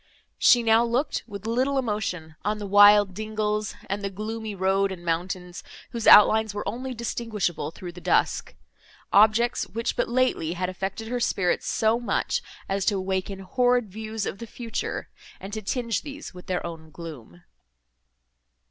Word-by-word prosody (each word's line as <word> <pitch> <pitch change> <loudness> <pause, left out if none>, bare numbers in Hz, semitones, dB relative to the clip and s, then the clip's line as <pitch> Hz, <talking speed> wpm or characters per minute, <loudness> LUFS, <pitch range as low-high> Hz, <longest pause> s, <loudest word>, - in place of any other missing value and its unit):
She 240 -1 +6
now 225 +1 +5
looked, 245 +5 0
with 200 -2 -8
little 255 +5 +1
emotion, 200 -10 -2
on 210 +1 0
the 210 - -5
wild 205 0 +7
dingles, 215 0 -2
and 200 +1 -3
the 200 - -2
gloomy 215 +2 -5
road 195 +1 +1
and 175 -2 -8
mountains, 180 +1 -3 0.3
whose 235 -3 -3
outlines 215 0 +7
were 205 - -4
only 250 +5 -4
distinguishable 220 -9 -2
through 175 +2 -8
the 180 +1 -12
dusk;—objects, 220 +7 +1
which 230 +1 -3
but - - 0
lately 240 -10 +1
had 180 +1 -2
affected 195 +4 -5
her 245 0 -1
spirits 185 -6 0
so 220 +1 +2
much, 240 - -1 0.3
as 195 0 -1
to 205 - +2
awaken 190 +1 -3
horrid 245 +1 +1
views 220 0 -4
of 195 - -5
the 230 - -7
future, 230 +1 -4 0.3
and 195 +2 -8
to 215 - -3
tinge 230 +2 -1
these 295 0 -8
with 180 0 -12
their 180 -1 -2
own 165 -2 -8
gloom. 145 - -10
210 Hz, 155 wpm, -25 LUFS, 185-230 Hz, 0.3 s, wild